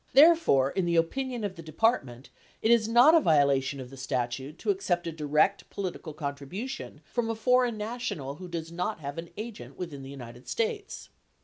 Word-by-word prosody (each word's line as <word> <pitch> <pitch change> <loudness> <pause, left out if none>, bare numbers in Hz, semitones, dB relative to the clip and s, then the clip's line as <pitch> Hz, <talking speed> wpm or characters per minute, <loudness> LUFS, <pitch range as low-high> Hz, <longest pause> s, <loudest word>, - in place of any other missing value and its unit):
Therefore, 280 - +6
in 190 - 0
the 170 0 +1
opinion 245 +8 0
of 200 -2 -2
the 165 - -9
Depart 195 - +2
ment, 125 0 -12 0.3
it 225 - +4
is 230 -2 +5
not 240 +7 +7
a 335 - +8
violation 140 - +3
of 130 -1 -8
the 135 - -11
statute 130 +3 -3
to - - +1
accept 180 - -1
a 165 - -2
direct 155 +5 +1
political 185 -4 -5
con 145 -2 -3
tribution 180 - -7
from 235 - -2
a 225 - -1
foreign 250 0 +2
national 210 - -4
who 185 - -8
does 165 -2 -5
not 180 +3 -2
have 140 +2 -5
an 165 0 -7
agent 215 0 -7
within 160 -6 -6
the 135 - -9
United 125 -3 -10
States. 445 -3 -3
170 Hz, 195 wpm, -28 LUFS, 140-235 Hz, 0.3 s, a